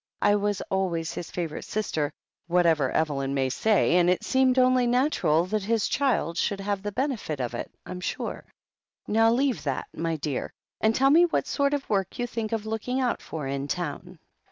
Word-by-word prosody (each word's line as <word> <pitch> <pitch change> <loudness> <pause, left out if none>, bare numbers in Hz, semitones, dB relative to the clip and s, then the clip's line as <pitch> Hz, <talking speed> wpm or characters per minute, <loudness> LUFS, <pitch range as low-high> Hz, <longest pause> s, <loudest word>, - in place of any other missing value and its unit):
"I 205 - +5
was 205 -1 0
always 175 -4 -1
his 170 - -6
favourite 165 -4 -4
sister, 160 -9 -2 0.4
whatever 165 -6 +3
Evelyn 140 -3 0
may 135 -1 +1
say, 195 - +3
and 175 0 +4
it 180 - +1
seemed 260 -1 +3
only 255 -1 +4
natural 240 - +2
that 210 +3 -1
his 220 +2 +1
child 205 - 0
should 200 - 0
have 200 0 -2
the 205 +1 -4
benefit 230 - -2
of 125 -2 -2
it, 120 - -4 0.2
I'm 180 - -6
sure. - - -4 0.6
Now 225 +1 +4
leave 260 0 +1
that, 135 -2 -1
my 165 0 -2
dear, 145 -3 -3 0.3
and 220 +1 +2
tell 270 +1 +4
me 335 +4 +7
what 340 - 0
sort 280 0 +1
of 280 - -5
work 195 -3 -1
you 245 - -1
think 230 -2 -4
of 220 -2 -2
looking 225 +4 -2
out 250 -2 0
for 155 -3 -6
in 140 +1 -3
town." 150 -2 -4
200 Hz, 190 wpm, -26 LUFS, 160-240 Hz, 0.6 s, me